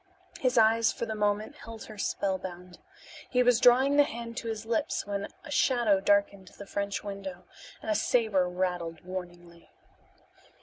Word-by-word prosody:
His 255 -1 +1
eyes 225 0 +5
for - - -4
the 220 - -4
moment 210 +6 -1
held 225 -1 -9
her 215 -2 -11
spellbound. 185 -3 -3 0.5
He 250 -1 +3
was 245 -1 +4
drawing 260 +4 +5
the 290 - +8
hand 235 -4 -6
to 230 - -4
his 220 -1 -4
lips 285 +7 -1
when 200 0 -3 0.2
a 295 - -10
shadow 240 -8 +3
darkened 200 -1 +1
the 200 - -9
French 200 0 -3
window, 195 -3 -7 0.4
and 220 - -2
a - - +4
saber 210 -6 +2
rattled 180 -2 -2
warningly. 175 -2 -8
205 Hz, 160 wpm, -29 LUFS, 185-235 Hz, 0.5 s, the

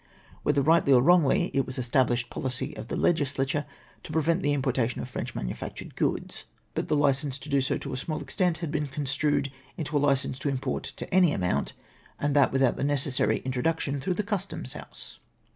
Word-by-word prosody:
Whether 145 -1 +2
rightly 160 -1 +4
or 125 - +7
wrongly, 170 -3 +4
it 135 - +1
was 130 - -4
the 130 - -2
established 120 0 +1
policy 130 +3 -2
of - - -7
the - - -3
legislature 145 -2 +1 0.3
to - - -9
prcYcnt 165 +3 +2
the 145 - +1
importation 130 -4 0
of - - -4
French - - -5
manufactured - - -5
goods, - - -1 0.3
but - - -2
the 155 - +2
licence 140 -1 +2
to 140 +2 -9
do 140 -1 +3
so 130 - 0
to 140 - -6
a - - -2
small 155 +4 -3
extent 180 -4 0
had 150 - -4
been 150 -2 -1
construed 140 0 0 0.3
into 150 -1 -4
a - - +5
licence 140 -2 +1
to 140 - -1
import 135 -1 -2
to - - -6
any 180 -5 +5
amount, 90 -6 0 0.5
and 145 0 0
that 140 -2 +5
with 135 0 +2
out 125 - +3
the - - -2
necessary 135 -6 +1
introduction 140 +2 0
through 185 +5 -1
the 210 - -1
Custom 200 -2 -3
house. - - -8
140 Hz, 200 wpm, -27 LUFS, 130-155 Hz, 0.5 s, or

